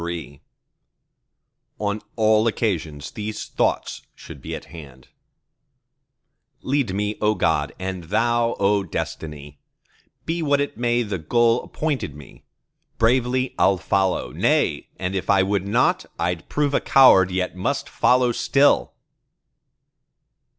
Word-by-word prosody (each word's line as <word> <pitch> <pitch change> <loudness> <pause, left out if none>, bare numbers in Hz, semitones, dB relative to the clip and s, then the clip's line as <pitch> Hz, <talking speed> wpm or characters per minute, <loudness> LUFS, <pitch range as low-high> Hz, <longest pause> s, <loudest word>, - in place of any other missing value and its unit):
CLXXXIV 85 -4 -6 1.4
On 105 0 -2
all 110 0 +3
occasions 80 - -2
these 105 0 -5
thoughts - - -1
should - - -12
be - - -5
at - - -9
hand:— 70 -6 -12 1.5
Lead 130 -8 0
me, 105 +1 -2
O 105 0 +2
God, - - 0
and 95 -2 -5
Thou, 120 +5 +1
O 100 +1 +2
Destiny 75 -5 -6 0.7
Be 165 +1 -2
what 145 -2 +2
it 145 - -2
may 120 0 +1
the 100 -4 -4
goal 115 +8 +2
appointed 145 - -3
me, 75 -3 -15 0.5
Bravely 125 +2 +1
I'll 95 0 +4
follow; 95 0 0
nay, - - 0
and 95 0 -3
if 95 - -3
I 100 -2 +4
would 100 0 -1
not, 100 - +1
I'd 90 -1 -3
prove 145 -1 0
a - - +2
coward, 95 -9 +6
yet 90 -1 -2
must 95 - -2
follow 125 -1 +2
still! 140 +4 +2
105 Hz, 125 wpm, -22 LUFS, 90-120 Hz, 1.5 s, coward